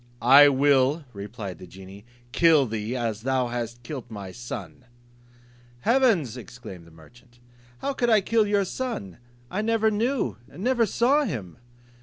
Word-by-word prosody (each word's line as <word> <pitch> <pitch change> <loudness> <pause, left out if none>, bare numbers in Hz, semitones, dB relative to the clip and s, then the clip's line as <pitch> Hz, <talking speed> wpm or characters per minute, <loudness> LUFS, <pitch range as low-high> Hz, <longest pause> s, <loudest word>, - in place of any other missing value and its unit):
"I 140 +4 +8
will," 140 +2 +2
replied 100 -3 -7
the 90 - -11
genie, 95 +3 -13 0.3
"kill 160 -3 +4
thee, 110 +1 -4
as 115 -3 -3
thou 130 0 0
hast 120 0 -5
killed 125 -1 -7
my 100 -4 -8
son." 120 -3 -8 1.0
"Heavens," 225 - +2
exclaimed 110 -6 -11
the - - -15
merchant, 120 +10 -19 0.4
"how 280 - -2
could 240 -2 0
I 220 -2 +5
kill 215 +2 +1
your 205 -1 +1
son? 185 - -5 0.3
I 200 - -1
never 220 0 +1
knew, 235 +5 -1
never 235 +3 0
saw 275 +8 +2
him." 110 - -6
130 Hz, 145 wpm, -25 LUFS, -, 1.0 s, I